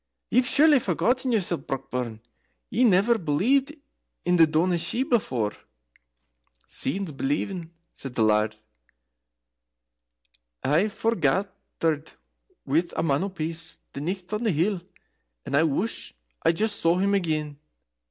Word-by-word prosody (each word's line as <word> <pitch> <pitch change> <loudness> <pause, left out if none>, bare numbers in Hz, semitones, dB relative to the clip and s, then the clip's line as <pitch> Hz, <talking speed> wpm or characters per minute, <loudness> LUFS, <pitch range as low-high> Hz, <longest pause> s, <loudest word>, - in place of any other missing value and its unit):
"Ye've 250 +2 +4
surely 295 0 +5
forgotten 245 - 0
yoursel, 185 -7 +1
Brockburn. 125 -4 -4 0.5
Ye 245 - +2
never 220 +3 +4
believed 245 - +1 0.5
in 180 +1 +3
the 165 -1 +7
Daoiné 170 +3 +1
Shi 200 +10 0
before." 125 - 0 1.1
"Seein's 185 +5 -2
believin'," 160 +5 -2 0.2
said 135 -3 -7
the 115 - +3
Laird. 110 0 +2 2.1
"I 155 +9 +3
forgathered 185 -6 -1 0.5
with 165 +5 +1
a - - +1
Man 145 -2 +2
o' - - -3
Peace 165 -2 -5 0.2
the 140 - -5
nicht 185 +4 -4
on 210 - -1
the 220 - +2
hill, 175 +4 +1 0.6
and 140 - -2
I 145 - +5
wush 165 +8 0 0.3
I - - +4
just 210 +4 -1
saw 165 +1 +3
him 200 +2 +2
again." 155 -6 -1
170 Hz, 125 wpm, -26 LUFS, 145-210 Hz, 2.1 s, the